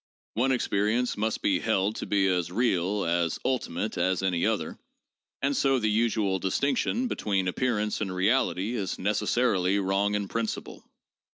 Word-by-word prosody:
One 130 +4 +1
experience 115 0 +1
must 110 +1 -2
be 95 -3 +2
held 105 0 0
to - - -5
be 100 -1 +2
as 90 -2 0
real, 100 -2 0
as 85 -1 0
ultimate, 110 -7 -2
as 95 +1 +1
any 90 -3 +1
other, - - -2 0.6
and 140 0 +1
so 135 -1 +3
the 110 -3 +1
usual 105 -3 +1
distinction 140 - 0
between 100 - -1
appear 120 +5 0
ance 105 0 -2
and 100 -3 -2
reality 100 +2 +1
is 100 -6 -3
necessarily 100 -1 +1
wrong 100 +1 +1
in 100 -1 -2
principle. 115 +2 -4
105 Hz, 155 wpm, -27 LUFS, 95-115 Hz, 0.6 s, so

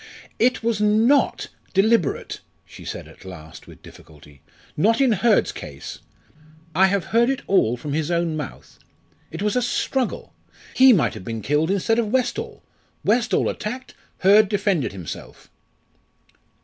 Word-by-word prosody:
"It 250 0 +2
was 225 -2 0
not 220 +7 +2 0.3
deliberate," 195 - +1 0.3
she - - -13
said - - -6
at - - -16
last 85 -4 -11
with - - -15
difficulty; 75 -2 -16 0.3
"not 225 +9 +2
in 270 -3 +4
Hurd's 220 +2 +2
case. - - -9 0.7
I 190 +4 +5
have 195 -1 -1
heard 235 +2 +4
it 270 - -2
all 125 - +2
from 140 +4 -5
his 155 +1 -1
own 170 -2 0
mouth. 150 -3 -8 0.5
It - - -6
was 210 +2 0
a 250 - +2
struggle 250 +1 -2 0.4
he 260 0 +7
might 190 -10 +2
have - - -9
been 115 +1 -5
killed 150 - +1
instead 200 +4 +1
of 230 - 0
Westall 260 - -2 0.4
Westall 230 +3 +1
attacked, 250 +4 -5 0.2
Hurd 200 +2 +5
defended 195 - 0
himself." 90 -6 -9
205 Hz, 145 wpm, -22 LUFS, 150-235 Hz, 0.7 s, he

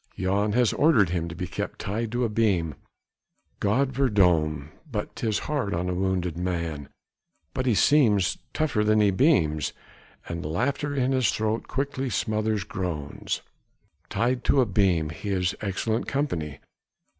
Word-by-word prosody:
Jan 100 +3 +1
has 120 -1 +3
ordered 135 - +4
him 85 -1 -1
to 85 - -7
be 90 +1 -3
kept - - -5
tied 110 +3 -3
to 120 +1 0
a - - +3
beam! 100 -8 +1 0.9
God 125 +7 +2
verdomme! 85 - +2 0.2
but 105 -3 -4
'tis 110 -3 0
hard 140 -11 -1
on 90 +2 -1
a - - 0
wounded 90 -2 -1
man, 85 -5 -3 0.6
but 130 0 -2
he 120 - +3
seems 105 - +4
tougher 145 -9 0
than 110 0 +3
the 105 -2 +4
beams, 95 - +2 0.5
and 85 0 -4
laughter 140 - -1
in 130 -1 +1
his 130 -5 +3
throat 110 +1 -1
quickly 135 -1 -2
smothers 110 -2 0
groans. 90 -8 -4 0.7
Tied 125 +1 0
to 140 - +4
a 130 - +5
beam, 90 -7 +2
he 100 +7 -6
is 95 -1 +1
excellent 110 +2 -1
company! 85 - -2
105 Hz, 150 wpm, -26 LUFS, 90-125 Hz, 0.9 s, a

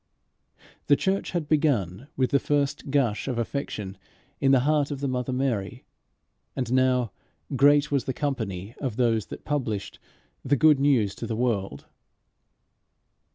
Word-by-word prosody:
The 145 - +6
church 190 +6 -1
had 170 -4 -2
begun 135 - +1
with 130 -2 +1
the 140 - +4
first 145 -1 -1
gush 135 -6 +1
of 125 -3 -2
affection 110 -5 -4 0.4
in 135 - +3
the 135 -2 +5
heart 150 +1 +2
of 145 -2 -4
the 140 - -2
mother 130 0 -2
Mary, 125 -7 -2 0.7
and 125 -2 -2
now 130 -3 +2 0.4
"great 145 +3 +4
was 140 -4 +1
the - - -1
company 110 -9 -3
of 130 -6 -2
those 115 -4 +1
that - - -9
published" 120 -9 -3 0.4
the 140 +2 +2
good 150 +1 +5
news 130 -8 +3
to - - -6
the 115 - -2
world. 110 -5 -2
130 Hz, 150 wpm, -26 LUFS, 115-145 Hz, 0.7 s, The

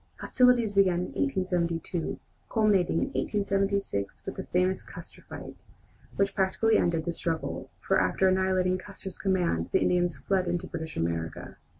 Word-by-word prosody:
Hostilities 250 -4 +3
began 185 -3 +3
in 180 - -5
1872, 170 +2 -1 0.3
culminating 210 -5 +2
in - - 0
1876 195 - -1
with - - -4
the - - -6
famous 185 +1 +1
"Custer - - -11
fight," - - -8 0.6
which 200 0 +1
practically 195 +3 +2
ended 165 -2 +1
the 170 - 0
struggle, 165 -1 -3
for - - +2
after 190 - +2
annihilating 185 -1 +2
Custer's 190 -1 -7
command 175 - +1
the - - +4
Indians 175 -4 +2
fled 185 +6 0
into 175 0 -1
British 160 0 -6
America. 80 -1 -3
185 Hz, 140 wpm, -28 LUFS, 170-195 Hz, 0.6 s, the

